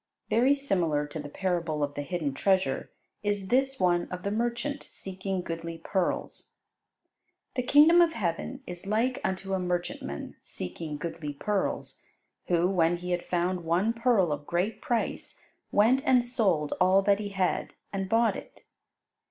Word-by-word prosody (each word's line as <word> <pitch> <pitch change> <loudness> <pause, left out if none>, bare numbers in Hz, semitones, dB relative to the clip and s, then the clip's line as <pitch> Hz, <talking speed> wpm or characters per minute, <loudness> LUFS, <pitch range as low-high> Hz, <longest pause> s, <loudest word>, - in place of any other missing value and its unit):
Very 255 +5 +5
similar 175 - 0
to 145 +2 -6
the 145 -1 -6
parable 170 -3 -1
of 145 0 -2
the 145 - -3
Hidden 150 -2 -2
Treasure 190 +5 +1 0.3
is 205 -2 -1
this 270 +1 +2
one 175 -2 +2
of 180 0 -6
the 200 - -1
merchant 240 +6 -1
seeking 190 -1 -5
goodly 165 0 -5
pearls. 180 +2 -2 1.0
"The 250 - +1
kingdom 300 +7 +7
of 335 -1 +4
heaven 210 - -3
is 180 +2 -8
like 230 +5 +1
unto 190 +1 -2
a 190 - +1
merchantman 175 - -3
seeking 150 - -6
goodly 155 -1 -5
pearls, 200 +7 -2 0.5
who, 175 0 +3
when 175 -2 +2
he 180 +1 -5
had 175 0 0
found 180 0 0
one 180 +7 +2
pearl 230 -8 +2
of 145 0 -4
great 180 +6 -1
price, 240 -6 -2 0.3
went 230 +6 +4
and 250 -4 +4
sold 195 - +1
all 190 +2 +5
that 200 0 +3
he 205 -1 -4
had, 190 -2 -1 0.2
and 195 -1 -2
bought 230 +1 +3
it." - - -10
185 Hz, 155 wpm, -28 LUFS, 170-225 Hz, 1.0 s, kingdom